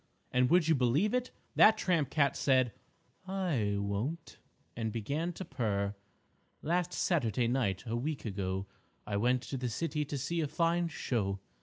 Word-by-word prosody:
And 125 0 +3
would 175 -1 +4
you 165 - +5
believe 140 - +2
it? 250 0 0 0.3
That 215 - +7
tramp 165 -7 +1
cat 140 -2 +2
said, 130 -3 +3 0.6
"I 165 - 0
won't!" 100 +11 -3 0.4
and 110 -1 -2
began 145 +11 -2
to 190 - -6
purr: 105 -8 -1 0.7
"_Last 175 +2 0
Saturday 120 - +1
night 115 -7 0
a 115 0 -2
week 140 +4 -3
ago 95 -2 -2 0.4
I 105 - -3
went 125 +4 +2
to 135 - -4
the 125 -1 -2
city 150 +5 -1
to 145 0 -4
see 165 +6 -1
a 155 - 0
fine 170 +3 +1
show. 105 -10 -2
135 Hz, 160 wpm, -32 LUFS, 110-165 Hz, 0.7 s, That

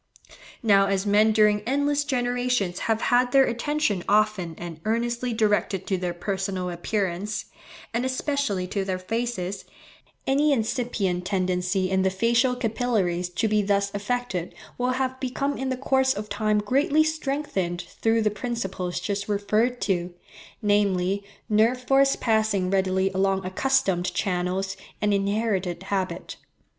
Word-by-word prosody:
Now 200 -3 +5
as 195 0 0
men 210 +2 +4
during 210 -1 +4
endless 285 +2 +1
generations 245 -8 0
have 225 0 +2
had 245 0 +4
their 270 0 +6
attention 240 - -1
often 205 -5 +2
and 170 -2 -8
earnestly 235 +2 -1
directed 210 -4 +1
to 190 - 0
their 175 -1 -3
personal 190 0 -2
appearance, 195 +2 -2 0.5
and 235 +2 0
especially 260 -7 -1
to 200 0 -1
their 190 -1 -2
faces, 200 -1 -3 0.6
any 285 +2 +3
incipient 220 -7 -1
tendency 185 0 0
in 190 0 +2
the 190 - +3
facial 235 +6 +2
capillaries 215 -7 0
to 180 +5 0
be 215 0 +2
thus 200 0 0
affected 205 -3 -3 0.2
will 250 +1 0
have 260 0 -2
become 275 +2 -2
in 265 -1 -3
the 260 - -1
course 265 0 +2
of 210 +1 -5
time 210 +1 +1
greatly 275 +8 +3
strengthened 275 - -2
through 225 +6 0
the 210 - +2
principles 200 -6 -3
just 200 0 -3
referred 215 +4 +1
to, 180 -3 -1 0.5
namely, 200 -2 +2 0.2
nerve 220 +4 +3
force 270 +2 +3
passing 215 -5 +1
readily 190 0 +1
along 190 0 0
accustomed 185 -4 +1
channels, 185 0 -1 0.2
and 210 -1 +1
inherited 195 -3 0
habit. 195 -1 -3
210 Hz, 135 wpm, -25 LUFS, 190-245 Hz, 0.6 s, their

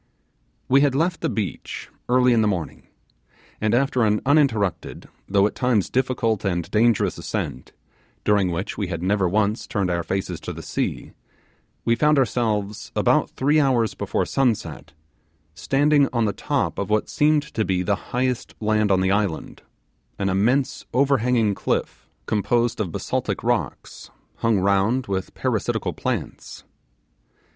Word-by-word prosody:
We 135 +2 +5
had 140 -2 +2
left 165 +4 0
the - - 0
beach 105 -4 -4 0.2
early 125 0 +4
in 115 - +3
the 110 - +2
morning, 90 -6 -4 0.7
and 110 +1 +2
after 130 -1 +2
an 105 -1 +2
uninterrupted, 115 - +1 0.2
though 100 0 +4
at 105 - 0
times 125 -7 0
difficult 120 -5 0
and 85 -4 -2
dangerous 115 0 +2
ascent, 65 - -4 0.5
during 100 -3 +2
which 90 +6 -4
we 100 - -1
had 85 -1 -4
never 95 -1 +1
once 105 +3 0
turned 100 -7 -1
our 85 0 0
faces 95 +3 -3
to - - -6
the - - -9
sea, - - -3 0.7
we 115 - +3
found 150 +3 +3
ourselves, 110 -6 -1
about - - +2
three 145 +3 +2
hours 125 -6 +2
before 100 -1 -2
sunset, 125 -5 -1 0.6
standing 140 - +2
on 115 -2 +1
the 105 - 0
top 140 -6 -2
of 100 - -3
what 105 0 +1
seemed 150 -1 +2
to 110 - 0
be 90 -3 0
the 100 +2 +1
highest 125 0 -2
land 110 -1 +1
on 95 -1 +3
the 95 0 +2
island, 100 -5 -2 0.6
an 100 -1 -1
immense 120 +9 +1
overhanging 125 -5 +2
cliff - - -3 0.2
composed 115 +3 0
of 95 -6 -2
basaltic - - -3
rocks, - - -3 0.3
hung 115 -2 +2
round 100 +6 +2
with 95 -1 -4
parasitical - - -1
plants. - - -5
110 Hz, 150 wpm, -23 LUFS, 100-130 Hz, 0.7 s, We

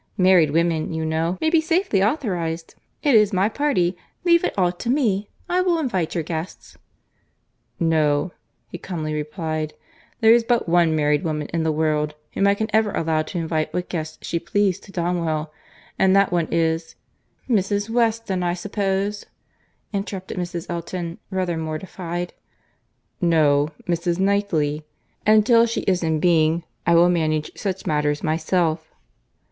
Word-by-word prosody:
Married 185 -5 +5
women, 165 +1 +1
you 160 0 -2
know, 165 +3 -1
may 315 - +1
be 330 -2 +4
safely 330 - +1
authorised. 180 - -1 0.3
It 285 - +3
is 210 -2 +5
my 190 +1 +2
party. 225 -10 +1 0.3
Leave 340 -1 +4
it - - -1
all 180 -2 +3
to 185 +7 -6
me. 215 -7 +1 0.2
I 360 +1 +1
will 360 -2 +2
invite 195 - -1
your 165 - 0
guests." 160 +3 -6 1.0
"No,"—he 160 +1 -1
calmly 160 -5 -4
replied,—"there 155 - -1
is 235 0 +4
but 235 -3 +1
one 170 -2 +3
married 150 +1 +2
woman 150 -3 -2
in 165 - +1
the 160 0 +1
world 150 -1 0 0.2
whom 200 - +2
I 200 - +4
can 220 +1 -2
ever 220 -1 +3
allow 160 -3 0
to 155 +3 -6
invite 160 -2 -2
what 180 0 -2
guests 155 -3 -4
she 170 - -1
pleases 190 +2 0
to 195 - -13
Donwell, 170 -4 -2 0.5
and 190 0 +4
that 200 -1 +4
one 170 -2 +1
is—" 165 0 0 0.5
"—Mrs. 205 -3 +1
Weston, 225 -5 +1
I 175 0 0
suppose," 200 +1 -2 0.7
interrupted 195 -2 -4
Mrs. 175 -1 -4
Elton, 170 0 -5
rather 185 -3 -1
mortified. 175 +2 -5 0.9
"No—Mrs. 165 +2 +1
Knightley;—and 195 +2 0
till 235 0 +5
she 230 - -2
is 185 -2 +1
in 160 -2 0
being, 165 0 +3 0.2
I 170 - +5
will 170 +1 +6
manage 155 -3 0
such 190 -2 -4
matters 150 -1 0
myself." 160 0 0
175 Hz, 145 wpm, -22 LUFS, 160-200 Hz, 1.0 s, will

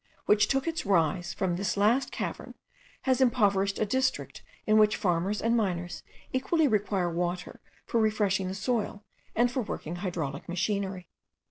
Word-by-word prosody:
which 210 0 +4
took 270 +2 0
its 330 0 -1
rise 175 -2 +1
from 185 -4 -1
this 195 0 -1
last 225 +7 +3
cavern, - - -5 0.5
has 260 -1 +2
impoverished 200 -6 +3
a - - +1
district 260 +4 -1 0.2
in 215 0 +4
which 215 0 +5
farmers 185 +2 0
and 230 +1 +1
miners 180 -5 -1 0.3
equally 295 +4 +2
require 205 -5 +1
water 175 +1 -3 0.3
for 230 - 0
refreshing 205 -3 +1
the 190 - -4
soil 210 -1 -2 0.3
and 240 +2 +3
for 255 - -1
working 175 -6 -5
hydraulic 165 -7 -4
machinery. 190 0 -2
200 Hz, 150 wpm, -28 LUFS, 180-230 Hz, 0.5 s, which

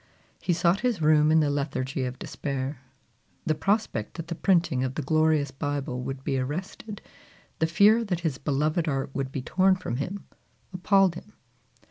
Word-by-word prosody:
He - - 0
sought 175 +2 +2
his 245 -6 0
room 155 -1 +4
in 160 0 +5
the 145 -1 +1
lethargy 130 -2 -2
of 125 0 -5
despair. 135 0 -4 0.6
The 155 - +2
prospect 195 - -1
that 165 -1 -7
the - - -1
printing 170 -7 +2
of 130 0 -3
the 155 - -2
glorious 155 -1 +2
Bible 140 -2 -3
would 135 +1 -5
be 135 -1 0
arrested, 185 +9 -5 0.6
the 160 - +2
fear 210 +7 +5
that 180 -4 -2
his 155 -6 -2
beloved 150 +4 0
art 135 -2 -1
would 135 -2 -3
be 135 -2 -4
torn 190 +6 +3
from 155 -9 -4
him, 185 +8 -4 0.5
appalled 190 0 +3
him. 210 +5 -11
155 Hz, 170 wpm, -26 LUFS, 135-180 Hz, 0.6 s, in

